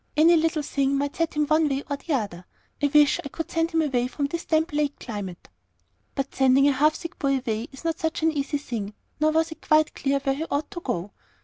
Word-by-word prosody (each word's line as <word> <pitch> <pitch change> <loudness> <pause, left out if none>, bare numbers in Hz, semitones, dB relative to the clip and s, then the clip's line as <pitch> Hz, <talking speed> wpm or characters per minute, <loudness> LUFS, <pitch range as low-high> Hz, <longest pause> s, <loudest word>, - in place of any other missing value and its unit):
Any 330 +3 +7
little 320 -1 +1
thing 275 -1 0
might 285 +1 -2
set 330 -2 -1
him 300 0 +2
one 310 +1 +3
way 275 0 -1
or 285 - -1
the 305 +3 -4
other. 195 -7 -4 0.4
I 290 - +4
wish 295 0 +4
I 280 - -6
could 325 +3 -6
send 330 0 +1
him 325 -2 +1
away 250 -4 0
from 285 +3 -2
this 335 +4 -4
damp 320 0 +1
lake 295 -1 0
climate." 200 -6 -6 0.7
But 275 0 -3
sending 265 +1 +4
a - - +5
half 300 +3 +3
sick 335 - -8
boy 275 -2 +2
away 230 -2 -3
is 270 - -12
not 330 +1 -1
such 320 -3 -2
an 320 - +4
easy 290 0 -1
thing, 220 -7 -5 0.2
nor 310 +1 +4
was 320 +1 +1
it 320 - -10
quite 310 0 +3
clear 275 0 0
where 270 -1 +1
he 300 +4 -3
ought 290 +4 -2
to 350 -4 -6
go. 180 - -3
290 Hz, 240 wpm, -25 LUFS, 270-315 Hz, 0.7 s, Any